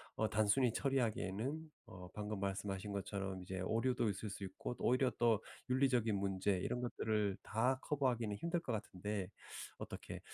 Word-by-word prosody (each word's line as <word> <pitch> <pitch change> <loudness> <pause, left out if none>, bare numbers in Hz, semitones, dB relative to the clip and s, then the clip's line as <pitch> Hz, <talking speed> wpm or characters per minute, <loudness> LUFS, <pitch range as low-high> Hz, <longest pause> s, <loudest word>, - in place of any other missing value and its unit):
어 110 - +1
단순히 110 +4 +4
처리하기에는 135 +3 0
어 90 0 -9
방금 105 -1 -3
말씀하신 100 +1 -2
것처럼 100 -1 -2
이제 95 0 -4
오류도 115 +4 +2
있을 100 +2 -3
수 100 0 -6
있고 95 +5 -4
또 - - -8
오히려 130 +1 +4
또 115 -3 +4 0.3
윤리적인 125 -4 +4
문제 95 0 +1
이런 125 +6 -1
것들을 110 -4 +1
다 125 +5 +2
커버하기는 125 -7 +1
힘들 170 - 0
것 130 -8 -3
같은데. 100 -2 -3 0.5
어떻게 - - -6
110 Hz, 355 characters per minute, -38 LUFS, 100-125 Hz, 0.5 s, 단순히